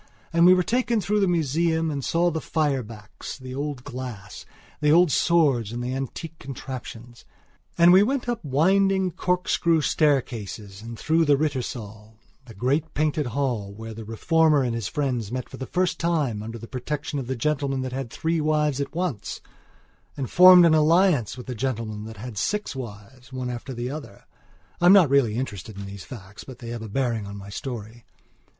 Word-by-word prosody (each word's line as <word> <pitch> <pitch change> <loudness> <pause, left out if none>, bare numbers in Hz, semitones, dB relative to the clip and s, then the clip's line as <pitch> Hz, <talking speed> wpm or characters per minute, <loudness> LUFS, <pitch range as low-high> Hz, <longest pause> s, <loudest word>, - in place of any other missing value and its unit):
And 170 +1 +6
we 185 - +8
were 180 - +2
taken 235 +3 +1
through 210 +1 0
the 195 - +3
museum 165 0 +1
and 140 -2 -3
saw 170 +4 +2
the 160 0 -3
fire 145 -4 0
backs, 105 -2 -9
the 130 -1 -9
old 140 -2 -4
glass, 120 -8 -8 0.3
the 150 0 +3
old 170 0 +5
swords 140 -12 +2
and 120 +1 -4
the 125 +1 -3
antique 150 +5 -6
contraptions. 120 -3 -8 0.5
And 170 +1 +7
we 190 - +8
went 250 +4 0
up 240 -2 -2
winding 190 +6 +2
corkscrew 170 -2 +1
staircases 115 -10 -1
and 115 +1 -8
through 160 +5 +2
the 145 -2 +4
Rittersaal, 115 -7 -4 0.3
the 115 -4 -13
great 140 +9 -1
painted 150 -2 0
hall 120 -5 -2
where 110 +1 -8
the 110 +1 -8
Reformer 150 +6 +2
and 120 -2 -1
his 115 -4 -3
friends 125 -8 -2
met 125 0 -4
for - - -10
the 130 - -6
first 180 0 0
time 150 -11 0
under 115 +2 -6
the 115 - -9
protection 145 +3 -4
of 130 - -5
the 130 - -2
gentleman 135 0 -1
that 130 -1 -4
had 130 -2 -4
three 160 +5 -1
wives 150 -2 +1
at 140 - -5
once 170 - -3 0.8
and 135 -3 -4
formed 180 -1 +9
an 165 - +5
alliance 155 - +3
with 125 - -8
the 125 - -5
gentleman 115 -4 -3
that 110 -1 -9
had 110 -1 -6
six 210 - -2
wives, 125 +2 -9
one 130 -1 -4
after 120 +2 -6
the 120 0 -4
other 145 -9 -9 0.6
(I'm 175 +2 +7
not 180 -9 +6
really 130 -6 +3
interested 110 -5 -5
in 100 - -6
these 100 -1 -9
facts 105 -4 -10
but 130 -3 -11
they 120 -2 -8
have 120 -1 -5
a 110 - -7
bearing 115 -3 -1
on 100 0 -7
my 100 0 -10
story). 115 0 -7
135 Hz, 190 wpm, -24 LUFS, 115-160 Hz, 0.8 s, formed